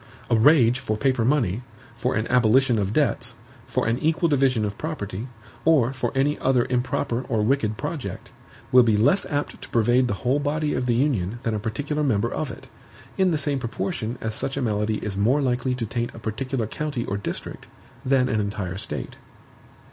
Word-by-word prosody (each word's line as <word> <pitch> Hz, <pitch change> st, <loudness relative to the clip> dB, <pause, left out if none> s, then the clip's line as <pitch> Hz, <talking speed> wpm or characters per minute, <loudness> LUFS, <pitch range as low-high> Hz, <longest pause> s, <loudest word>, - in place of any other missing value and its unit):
A -, -, +5 dB
rage 125 Hz, 0 st, +5 dB
for 110 Hz, -5 st, -2 dB
paper 130 Hz, 0 st, +1 dB
money, 120 Hz, -5 st, +1 dB, 0.3 s
for 125 Hz, +2 st, -1 dB
an 110 Hz, -, 0 dB
abolition 125 Hz, 0 st, +3 dB
of 100 Hz, -1 st, -1 dB
debts, 120 Hz, -3 st, +1 dB, 0.3 s
for 130 Hz, -, -1 dB
an 115 Hz, +2 st, 0 dB
equal 165 Hz, +3 st, +2 dB
division 130 Hz, -6 st, +2 dB
of 100 Hz, -1 st, -3 dB
property, 115 Hz, -8 st, -4 dB, 0.4 s
or 135 Hz, -6 st, +4 dB
for 130 Hz, -, -2 dB
any 140 Hz, +3 st, +1 dB
other 130 Hz, -2 st, +2 dB
improper 125 Hz, -1 st, 0 dB
or 110 Hz, -4 st, +1 dB
wicked 110 Hz, -3 st, +1 dB
project, 150 Hz, -1 st, -5 dB, 0.4 s
will 125 Hz, -, +8 dB
be 110 Hz, -3 st, +3 dB
less 145 Hz, -, +3 dB
apt 145 Hz, -1 st, -3 dB
to -, -, -10 dB
pervade 120 Hz, +2 st, +3 dB
the 105 Hz, -, -1 dB
whole 130 Hz, +4 st, +3 dB
body 150 Hz, +1 st, -1 dB
of 125 Hz, -, -1 dB
the 120 Hz, -, +2 dB
Union 120 Hz, -6 st, 0 dB
than 115 Hz, -, 0 dB
a 105 Hz, -, -1 dB
particular 140 Hz, +8 st, -2 dB
member 115 Hz, -4 st, +1 dB
of 155 Hz, -, -2 dB
it; -, -, -10 dB, 0.5 s
in 190 Hz, -1 st, +3 dB
the 160 Hz, -, +1 dB
same 145 Hz, -2 st, 0 dB
proportion 120 Hz, -, -3 dB
as 110 Hz, -1 st, -2 dB
such 135 Hz, +5 st, -3 dB
a -, -, 0 dB
malady 105 Hz, -1 st, 0 dB
is 100 Hz, -2 st, -3 dB
more 120 Hz, +8 st, +3 dB
likely 125 Hz, -1 st, 0 dB
to 120 Hz, -2 st, -3 dB
taint 120 Hz, +2 st, -3 dB
a -, -, -8 dB
particular 120 Hz, +2 st, -2 dB
county 140 Hz, +1 st, -3 dB
or 100 Hz, -, -2 dB
district, 100 Hz, -, -6 dB, 0.4 s
than 130 Hz, -1 st, +3 dB
an 110 Hz, -4 st, 0 dB
entire 100 Hz, -3 st, -3 dB
State. -, -, -5 dB
125 Hz, 195 wpm, -24 LUFS, 110-140 Hz, 0.5 s, will